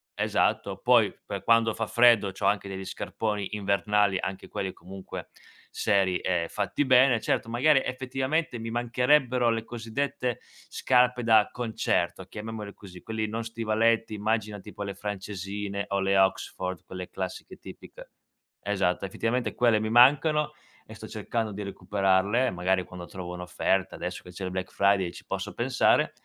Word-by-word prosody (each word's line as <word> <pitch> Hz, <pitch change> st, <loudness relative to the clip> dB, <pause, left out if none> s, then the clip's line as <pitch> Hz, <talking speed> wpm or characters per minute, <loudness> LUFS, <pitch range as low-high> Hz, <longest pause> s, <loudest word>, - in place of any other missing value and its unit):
esatto. -, -, 0 dB
Poi -, -, +4 dB
per -, -, -5 dB
quando 115 Hz, -1 st, +4 dB
fa 115 Hz, 0 st, -3 dB
freddo 115 Hz, -4 st, +5 dB
c'ho 95 Hz, -, -5 dB
anche 100 Hz, -1 st, +1 dB
degli 95 Hz, 0 st, -6 dB
scarponi 105 Hz, 0 st, -3 dB
invernali, 100 Hz, 0 st, +2 dB
anche 95 Hz, +1 st, -5 dB
quelli 95 Hz, -1 st, -3 dB
comunque 95 Hz, +1 st, -9 dB, 0.4 s
seri 95 Hz, -3 st, +1 dB
e 90 Hz, -2 st, 0 dB
fatti 105 Hz, +8 st, -1 dB
bene. 130 Hz, -2 st, +5 dB
Certo 115 Hz, -, -1 dB
magari, 135 Hz, +4 st, +4 dB
effettivamente, 130 Hz, +3 st, -2 dB
mi 115 Hz, 0 st, -5 dB
mancherebbero 125 Hz, +1 st, +2 dB
le 115 Hz, -1 st, 0 dB
cosiddette 120 Hz, +2 st, -3 dB, 0.3 s
"scarpe 125 Hz, -1 st, +2 dB
da 110 Hz, -2 st, +5 dB
concerto", 110 Hz, -6 st, -1 dB
chiamiamole 105 Hz, +1 st, -7 dB
così, 90 Hz, -3 st, -12 dB
quelli 110 Hz, -1 st, -3 dB
non 115 Hz, +2 st, -3 dB
stivaletti, 115 Hz, 0 st, +1 dB
immagina 105 Hz, 0 st, -1 dB
tipo 105 Hz, +1 st, -8 dB
le 100 Hz, -1 st, -4 dB
francesine 100 Hz, 0 st, -4 dB
o 100 Hz, -, 0 dB
le 95 Hz, 0 st, +1 dB
Oxford 95 Hz, -2 st, 0 dB
quelle 90 Hz, -1 st, -7 dB
classiche 95 Hz, -1 st, -6 dB
tipiche -, -, -12 dB, 0.5 s
esatto, 100 Hz, -2 st, 0 dB
effettivamente 115 Hz, +6 st, -2 dB
quelle 115 Hz, -3 st, +3 dB
mi 110 Hz, 0 st, -2 dB
mancano 145 Hz, +6 st, +5 dB, 0.3 s
e -, -, -12 dB
sto -, -, -9 dB
cercando 115 Hz, -2 st, -3 dB
di 105 Hz, +1 st, -5 dB
recuperarle, 100 Hz, +4 st, +1 dB
magari 90 Hz, +1 st, 0 dB
quando 90 Hz, 0 st, -9 dB
trovo 90 Hz, -2 st, -7 dB
un'offerta 90 Hz, +1 st, -1 dB
adesso -, -, -5 dB
che -, -, -13 dB
c'è 95 Hz, +2 st, -6 dB
il 90 Hz, -, -4 dB
Black 95 Hz, 0 st, -4 dB
Friday 100 Hz, -3 st, +2 dB
ci -, -, -12 dB
posso -, -, -4 dB
pensare -, -, +2 dB
105 Hz, 150 wpm, -27 LUFS, 95-120 Hz, 0.5 s, freddo